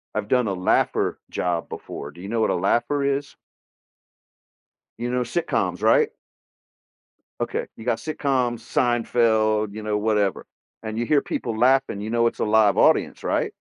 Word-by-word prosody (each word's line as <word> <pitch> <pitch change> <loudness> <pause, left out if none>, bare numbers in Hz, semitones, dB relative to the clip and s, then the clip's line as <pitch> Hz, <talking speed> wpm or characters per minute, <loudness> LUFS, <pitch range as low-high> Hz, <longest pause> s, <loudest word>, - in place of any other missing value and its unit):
I've 105 -1 -2
done 125 -1 +2
a 100 - -1
laugher 90 0 +1
job 85 -2 -2
before. 70 - -7
Do 85 - -14
you 100 - -7
know 115 0 0
what - - +2
a - - +1
laugher 120 +10 +1
is? 140 +1 -1 1.6
You 120 +1 -3
know, 125 0 0
sitcoms, 160 +8 -1
right? 455 -2 +4 1.3
Okay, 480 +1 -2
you - - -11
got - - +1
sitcoms, 135 -6 -1
Seinfeld, 110 -3 +1
you 110 - -6
know, 105 0 -1
whatever, 105 -2 0 0.4
and 110 0 -5
you 120 - -1
hear 145 +2 +3
people 115 -2 -4
laughing, 130 -3 +3
you 105 - -5
know 115 0 +2
it's - - -4
a - - +1
live 105 -1 +4
audience, - - +3
right? - - 0
115 Hz, 165 wpm, -23 LUFS, 105-125 Hz, 1.6 s, right